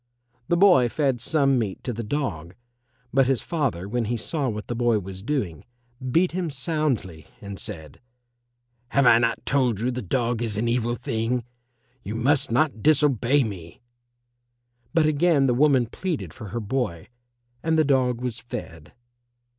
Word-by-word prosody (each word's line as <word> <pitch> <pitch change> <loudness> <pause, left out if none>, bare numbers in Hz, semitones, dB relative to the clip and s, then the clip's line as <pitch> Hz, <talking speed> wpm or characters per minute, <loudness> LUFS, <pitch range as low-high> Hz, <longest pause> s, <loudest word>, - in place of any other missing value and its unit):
The 175 - +2
boy 175 -10 +6
fed 135 -3 0
some 140 -3 +2
meat 100 -5 -4
to 125 - -3
the 115 +1 -4
dog, 100 - -3 0.6
but 135 -1 +4
his 135 -3 +1
father, 135 - -2
when 120 +2 -1
he 120 +2 -1
saw 145 +2 -1
what 105 -1 -5
the - - -4
boy 120 -1 +2
was 95 -1 -7
doing, 105 - -2 0.5
beat 170 +8 +3
him 175 -1 -2
soundly, 135 - -2
and 100 -1 -8
said, 80 -3 -6 0.9
"Have 140 +2 +2
I 115 -1 +7
not 115 0 0
told 125 -7 +1
you 120 +3 0
the 125 0 -4
dog 120 +3 -1
is 110 -3 -2
an 115 +2 0
evil 120 0 0
thing? 115 +2 -2 0.6
You 105 -1 -6
must 130 +5 +1
not 125 -1 +1
disobey 145 -2 +3
me." 90 -6 -7 1.1
But 165 -2 +3
again 155 -1 +3
the 125 - +3
woman 135 -1 +4
pleaded 170 +7 -4
for 115 -5 -9
her 120 +5 -4
boy, 105 -6 -3 0.5
and 160 0 +1
the 155 - +4
dog 125 -3 +1
was 125 -3 -3
fed. 80 - -8
120 Hz, 160 wpm, -24 LUFS, 110-140 Hz, 1.1 s, I